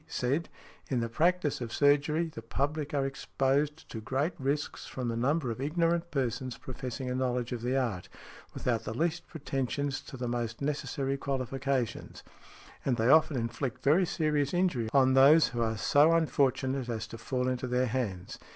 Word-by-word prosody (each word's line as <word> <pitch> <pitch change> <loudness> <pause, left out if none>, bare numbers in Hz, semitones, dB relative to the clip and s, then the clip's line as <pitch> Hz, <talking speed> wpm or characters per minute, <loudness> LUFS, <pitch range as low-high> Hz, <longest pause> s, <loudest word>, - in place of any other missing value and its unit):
said; 140 +7 -1 0.4
"In 130 - +1
the 115 0 -2
practice 160 +2 +1
of 115 -2 -4
surgery, 145 +4 +3
the - - -7
public 145 +6 -2
are 140 -2 0
exposed 140 +2 -1
to 110 - -5
great 135 +9 -1
risks 140 +2 -2
from 125 -2 -4
the 115 - -2
number 130 +2 0
of 115 - -5
ignorant 165 +3 0
persons 130 -3 -2
professing 130 0 -6
a 125 - -1
knowledge 125 -1 -1
of 120 -2 -3
the 125 +3 0
art, 115 -9 -2 0.5
without 115 -3 -1
the 110 0 -5
least 170 +1 -1
pretensions 140 -2 -2
to 135 - -10
the 125 0 -3
most 120 -1 -3
necessary 140 -1 -2
qualifications, 135 -2 -2 0.6
and 125 -3 +1
they 115 +1 +2
often 155 -1 +5
inflict 115 +1 -3
very 170 +6 +4
serious 155 -3 0
injury 175 -12 +1
on 130 -1 +4
those 145 +4 +7
who 120 -1 -3
are 110 -1 0
so 145 +9 +4
unfortunate 135 -5 +1
as 110 -1 -3
to 115 0 -10
fall 125 +2 -1
into 125 0 -1
their 125 +1 +1
hands. 110 -7 -3
135 Hz, 170 wpm, -30 LUFS, 120-145 Hz, 0.6 s, those